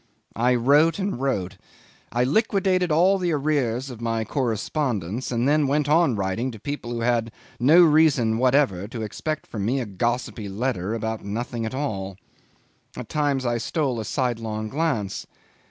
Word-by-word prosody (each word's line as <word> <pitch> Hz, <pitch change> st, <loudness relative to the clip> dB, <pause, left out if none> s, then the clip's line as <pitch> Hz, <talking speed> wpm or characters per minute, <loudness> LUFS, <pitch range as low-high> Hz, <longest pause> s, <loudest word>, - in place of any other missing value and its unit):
I 125 Hz, +3 st, +2 dB
wrote 145 Hz, +7 st, +4 dB
and 195 Hz, -10 st, -2 dB
wrote; 100 Hz, -8 st, -1 dB, 0.5 s
I 120 Hz, +1 st, +1 dB
liquidated 185 Hz, -, +1 dB
all 185 Hz, +5 st, +4 dB
the 175 Hz, -2 st, 0 dB
arrears 135 Hz, -4 st, 0 dB
of 120 Hz, -2 st, -10 dB
my 115 Hz, -1 st, -1 dB
correspondence, 120 Hz, -, -2 dB
and 120 Hz, +1 st, +1 dB
then 150 Hz, 0 st, +3 dB
went 145 Hz, +1 st, +1 dB
on 150 Hz, -4 st, +3 dB
writing 100 Hz, +5 st, -1 dB
to 110 Hz, -4 st, -9 dB
people 145 Hz, 0 st, -5 dB
who 120 Hz, -1 st, -3 dB
had 115 Hz, -1 st, +1 dB, 0.3 s
no 155 Hz, +9 st, +7 dB
reason 150 Hz, -8 st, +4 dB
whatever 125 Hz, -8 st, +2 dB
to 115 Hz, -1 st, -6 dB
expect 155 Hz, +8 st, -4 dB
from 105 Hz, -3 st, -5 dB
me 125 Hz, +6 st, 0 dB
a 125 Hz, -, -2 dB
gossipy 115 Hz, +1 st, -2 dB
letter 105 Hz, -1 st, -2 dB
about 110 Hz, 0 st, -3 dB
nothing 115 Hz, +2 st, -3 dB
at 130 Hz, -, -5 dB
all. 100 Hz, -9 st, -3 dB, 0.8 s
At -, -, -7 dB
times 145 Hz, -3 st, 0 dB
I 120 Hz, -1 st, 0 dB
stole 135 Hz, -1 st, -1 dB
a -, -, -3 dB
sidelong 110 Hz, -3 st, -2 dB
glance. 135 Hz, -, -2 dB
125 Hz, 160 wpm, -24 LUFS, 110-145 Hz, 0.8 s, no